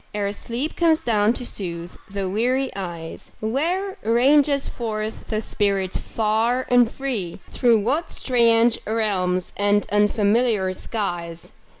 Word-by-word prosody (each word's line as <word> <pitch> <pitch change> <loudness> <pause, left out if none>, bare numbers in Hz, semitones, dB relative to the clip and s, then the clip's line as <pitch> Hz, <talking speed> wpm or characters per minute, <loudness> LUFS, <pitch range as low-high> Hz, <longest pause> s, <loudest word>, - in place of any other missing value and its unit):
Ere 200 -1 -1
sleep 240 +8 -4
comes 330 -2 +3
down 215 -2 +2
to 245 +1 -5
soothe 175 -5 -4
the 195 -1 -3
weary 250 +7 0
eyes, 170 -4 -7
Where 340 - -1
ranges 275 +5 +3
forth 220 -2 -4
the 215 -1 -1
spirit 200 -4 0
far 225 +3 0
and 245 -2 +5
free? 230 -11 -4
Through 235 -4 +3
what 295 +10 0
strange 235 -2 +3
realms 190 -5 0
and 205 0 +2
unfamiliar 210 -1 +2
skies. 175 -6 -5
220 Hz, 120 wpm, -23 LUFS, 200-245 Hz, -, and